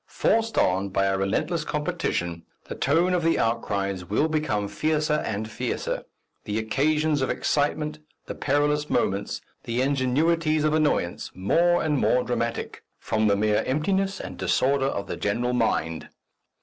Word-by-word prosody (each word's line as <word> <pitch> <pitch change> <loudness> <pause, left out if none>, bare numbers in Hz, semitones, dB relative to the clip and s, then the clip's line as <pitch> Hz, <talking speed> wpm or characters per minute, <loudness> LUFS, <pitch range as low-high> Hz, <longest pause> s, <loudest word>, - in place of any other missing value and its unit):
Forced 225 0 +1
on 95 +2 +2
by 95 0 +1
a 95 0 +1
relentless 95 - 0
competition, 150 - -2 0.2
the - - -6
tone 165 +7 +2
of 180 - +2
the 165 0 +2
outcries 100 -5 -1
will 105 - +1
become 155 -10 -1
fiercer 155 +6 0
and 110 0 -3
fiercer; 110 - -3 0.4
the 105 +1 -2
occasions 150 +6 +1
of 130 - 0
excitement, 150 +1 0 0.3
the - - -5
perilous 145 +1 0
moments, 100 +1 0 0.2
the 115 +1 -2
ingenuities 155 +4 +1
of 155 0 +2
annoyance, 150 - 0
more 170 - +2
and 150 -3 +1
more 125 0 +3
dramatic, 120 -1 -3 0.2
from 110 0 0
the 100 - +4
mere 105 +1 +2
emptiness 190 +8 0
and 90 -1 -7
disorder 135 +9 +2
of 100 -7 -2
the - - -5
general 120 +4 -1
mind! 80 -9 0
135 Hz, 150 wpm, -25 LUFS, 105-155 Hz, 0.4 s, the